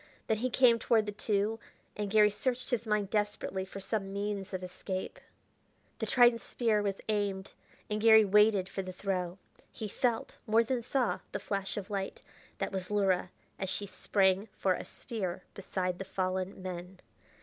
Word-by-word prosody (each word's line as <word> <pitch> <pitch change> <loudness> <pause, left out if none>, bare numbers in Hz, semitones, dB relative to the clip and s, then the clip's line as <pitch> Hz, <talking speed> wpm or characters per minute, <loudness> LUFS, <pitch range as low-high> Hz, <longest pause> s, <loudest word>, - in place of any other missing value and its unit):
Then 220 - +1
he 250 +4 0
came 240 -1 +5
toward 225 -1 +3
the 210 - -3
two 210 +1 0 0.4
and 210 -1 -2
Garry 210 0 +5
searched 250 +5 -2
his 235 -2 0
mind 210 -2 +1
desperately 205 -2 -1
for 190 +1 -8
some 195 0 -2
means 200 0 -3
of 185 -1 -4
escape. 185 +1 -5 0.8
The - - -2
trident 240 -2 +5
spear 225 -4 +1
was 200 -1 -2
aimed, 200 -3 -1 0.3
and 210 0 -2
Garry 220 -1 +8
waited 205 -1 +5
for 195 - -4
the 185 -1 -6
throw. 185 -2 -2 0.3
He 215 - -5
felt, 230 +2 -1
more 225 +2 +5
than 245 +1 -1
saw, 250 0 0
the - - -1
flash 195 -1 -3
of 205 +1 -5
light 195 -1 -3 0.3
that - - -2
was 190 -2 -4
Luhra 195 -3 +2 0.3
as 190 - -2
she 205 - -2
sprang 195 0 +2
for 190 - +2
a - - -5
spear 185 -7 -5
beside 185 -2 -3
the - - -2
fallen 185 0 -2
men. 180 0 -6
205 Hz, 170 wpm, -31 LUFS, 190-220 Hz, 0.8 s, Garry